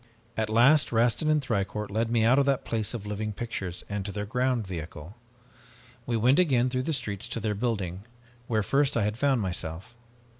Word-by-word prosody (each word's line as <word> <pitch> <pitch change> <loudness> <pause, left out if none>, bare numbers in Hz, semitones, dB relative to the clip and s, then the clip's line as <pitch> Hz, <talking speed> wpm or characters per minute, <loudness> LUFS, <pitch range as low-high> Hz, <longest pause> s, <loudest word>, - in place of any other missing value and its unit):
"At 110 -1 -1
last 130 +7 +5
Rastin 120 +6 +2
and 155 -2 +2
Thicourt 105 -2 -2
led 110 +2 0
me 115 -1 +2
out 125 +5 +5
of 140 - +2
that 135 -2 +1
place 110 0 -1
of 105 -3 -6
living 105 +1 -3
pictures 100 -6 -5
and 100 -1 -3
to 100 - -5
their 105 0 -4
ground 125 +1 0
vehicle. 85 0 -7 0.9
We 120 - +1
went 125 +7 +4
again 130 -8 +3
through 130 0 0
the - - +2
streets 110 -5 -3
to 115 - -2
their 105 -1 -1
building, 100 -4 -2 0.4
where 110 -3 +1
first 140 +4 +2
I 110 - +2
had 105 +1 -1
found 135 -1 +2
myself. 90 +3 -5
110 Hz, 195 wpm, -27 LUFS, 100-125 Hz, 0.9 s, last